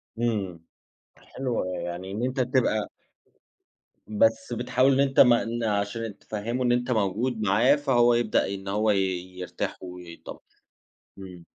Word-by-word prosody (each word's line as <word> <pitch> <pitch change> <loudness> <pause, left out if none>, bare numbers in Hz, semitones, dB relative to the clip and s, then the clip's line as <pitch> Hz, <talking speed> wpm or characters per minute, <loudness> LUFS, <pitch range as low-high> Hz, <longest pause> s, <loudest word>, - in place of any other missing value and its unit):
امم، 105 -7 -2 0.6
حلوة 125 -7 -3
يعني 90 +2 -5
إن 110 +5 -3
أنت 130 +1 -2
تبقى 125 -4 +1 1.2
بس 110 +2 +1
بتحاول 125 +3 +2
إن 135 - +1
أنت 135 -1 +2
ما 120 -2 +6
ن 115 +1 -3
عشان 105 0 -2
تفهِّمه 115 +4 -3
إن 120 - +2
أنت 125 +1 0
موجود 110 +2 0
معاه، 110 +7 +4
فهو 125 -5 +3
يبدأ 120 -2 +1
إن 95 0 -8
هو 105 +2 +1
ي 100 - +2 0.4
يرتاح 90 - -4
ويتطمِّن، 90 -2 -10 0.8
امم. 90 -3 -10
115 Hz, 135 wpm, -26 LUFS, 100-125 Hz, 1.2 s, ما